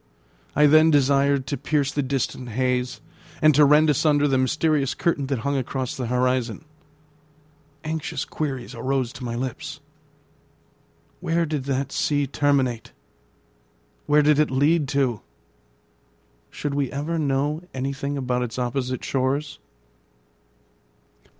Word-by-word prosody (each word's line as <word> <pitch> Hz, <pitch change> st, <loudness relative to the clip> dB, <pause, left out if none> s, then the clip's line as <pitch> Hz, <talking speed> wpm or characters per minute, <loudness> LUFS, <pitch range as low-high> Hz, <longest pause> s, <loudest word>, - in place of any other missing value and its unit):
I 150 Hz, -, +5 dB
then 155 Hz, +2 st, +6 dB
desired 140 Hz, -1 st, +3 dB
to 140 Hz, +2 st, -3 dB
pierce 145 Hz, -2 st, 0 dB
the 145 Hz, -, -1 dB
distant 130 Hz, -2 st, -3 dB
haze, 125 Hz, +1 st, -1 dB, 0.4 s
and 155 Hz, 0 st, +5 dB
to 150 Hz, +2 st, +5 dB
rend 150 Hz, +2 st, +5 dB
asunder 145 Hz, 0 st, +3 dB
the 135 Hz, -2 st, +2 dB
mysterious 150 Hz, +1 st, +1 dB
curtain 145 Hz, -5 st, 0 dB
that 135 Hz, -4 st, -2 dB
hung 140 Hz, 0 st, 0 dB
across 130 Hz, -1 st, -3 dB
the 125 Hz, -3 st, -4 dB
horizon. 125 Hz, +1 st, 0 dB, 1.2 s
Anxious 155 Hz, -1 st, -3 dB
queries 135 Hz, -5 st, -4 dB
arose 130 Hz, 0 st, -2 dB
to 135 Hz, -, -9 dB
my 120 Hz, -1 st, -3 dB
lips. 140 Hz, +5 st, -5 dB, 1.4 s
Where 165 Hz, +1 st, 0 dB
did 150 Hz, -4 st, -3 dB
that 135 Hz, 0 st, -2 dB
sea 145 Hz, -1 st, 0 dB
terminate? 135 Hz, -4 st, 0 dB, 1.1 s
Where 150 Hz, 0 st, +4 dB
did 150 Hz, 0 st, +4 dB
it 150 Hz, -, +3 dB
lead 145 Hz, +3 st, +2 dB
to? 130 Hz, -5 st, 0 dB, 1.3 s
Should 145 Hz, -1 st, -4 dB
we 140 Hz, -2 st, -1 dB
ever 155 Hz, +4 st, -2 dB
know 145 Hz, +2 st, 0 dB
anything 140 Hz, +2 st, -3 dB
about 125 Hz, -2 st, -1 dB
its 125 Hz, -1 st, -4 dB
opposite 125 Hz, 0 st, -2 dB
shores? 140 Hz, +3 st, -1 dB
140 Hz, 125 wpm, -23 LUFS, 130-150 Hz, 1.4 s, then